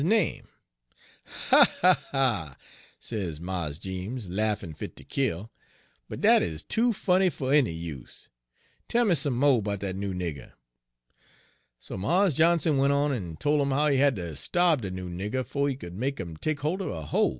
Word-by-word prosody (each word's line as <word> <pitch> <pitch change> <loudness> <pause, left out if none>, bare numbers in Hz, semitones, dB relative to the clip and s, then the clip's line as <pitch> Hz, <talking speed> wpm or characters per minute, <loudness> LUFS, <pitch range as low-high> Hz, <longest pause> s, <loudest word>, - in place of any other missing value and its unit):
sez 90 -9 -4
Mars 85 -4 -4
Jeems, 95 +4 -5
laffin' 105 -3 -1
fit - - -8
ter - - -12
kill, 115 -6 -2 0.6
'but - - -6
dat - - +6
is 80 -1 -3
too 235 +2 +2
funny 190 -2 +2
fer 135 -5 -2
any 145 -6 +5
use. 80 -6 -8 0.6
Tell 240 0 +2
me 200 - +4
some 140 -4 +1
mo' 130 -2 +3
'bout 100 -1 -3
dat 95 -2 -3
noo 100 0 -3
nigger.' 85 -7 -5 1.3
"So - - -8
Mars 175 - +2
Johnson 160 0 +3
went 140 +1 +3
on 140 0 +1
en 90 -10 -5
tol' 150 0 +1
'im 140 - 0
how 145 +3 +2
he 140 - +2
had 140 -1 +3
ter 85 -4 -5
starbe 160 - +1
de 100 - -4
noo 95 0 -6
nigger 100 +9 -3
'fo' 140 0 -1
he 135 - -1
could 90 -9 -9
make 135 +7 -2
'im 85 -4 -6
take 145 - -3
holt 165 +7 -1
er - - -3
a 80 -2 -5
hoe. 75 - +1
120 Hz, 170 wpm, -27 LUFS, 90-145 Hz, 1.3 s, dat